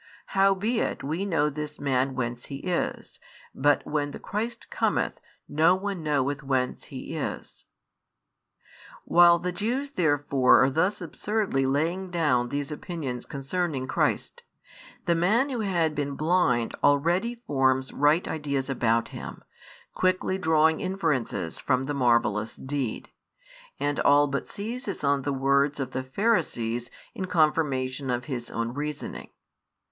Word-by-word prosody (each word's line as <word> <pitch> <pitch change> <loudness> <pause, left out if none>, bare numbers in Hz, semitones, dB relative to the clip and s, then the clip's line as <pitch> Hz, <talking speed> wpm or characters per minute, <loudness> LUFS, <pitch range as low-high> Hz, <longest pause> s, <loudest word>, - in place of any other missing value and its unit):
|48 - - -25 0.3
Howbeit 195 +4 +1
we 160 +8 -2
know 160 -5 +2
this 150 0 -5
Man 135 -1 0
whence 120 -1 -3
He 140 - -6
is: 175 +5 -3 0.3
but 145 +2 +2
when 145 -1 -1
the - - -7
Christ 220 +4 -4
cometh, - - 0 0.3
no 160 +4 +4
one 195 -1 -4
knoweth 145 -1 0
whence 130 -2 -1
He - - -7
is. - - -5 1.4
While 175 0 +6
the 180 +1 -3
Jews 240 +10 -2
therefore 145 - +4
are 135 - +2
thus 180 +9 +1
absurdly 175 -4 -1
laying 165 +7 0
down 145 -9 +1
these 145 +2 -3
opinions 150 -6 -5
concerning 140 0 -2
Christ, - - -1 0.6
the 170 - +3
man 210 +11 +2
who 255 -3 -3
had 175 -7 +1
been 145 -1 -2
blind 155 -7 +2
already 170 +11 +2
forms 130 -1 +1
[right] 150 +4 +3
ideas 140 -3 -2
about 115 -3 +1
Him, - - -8 0.5
quickly 185 +1 +1
drawing 160 -2 +3
inferences 160 - -1
from 130 -1 +1
the 145 +2 -3
marvellous 115 -5 +1
deed, 130 -4 -4 0.7
and 145 0 -1
all 145 +1 +5
but 140 -1 -3
seizes 230 - -5
on 140 -1 +2
the 140 +2 -2
words 140 +2 +2
of 130 -1 -3
the 130 - -2
Pharisees 130 - 0 0.2
in 190 - -4
confirmation 145 -6 +1
of 125 0 -1
his 125 -4 -4
own 115 +1 -3
reasoning. 150 +1 -5
145 Hz, 135 wpm, -26 LUFS, 130-175 Hz, 1.4 s, While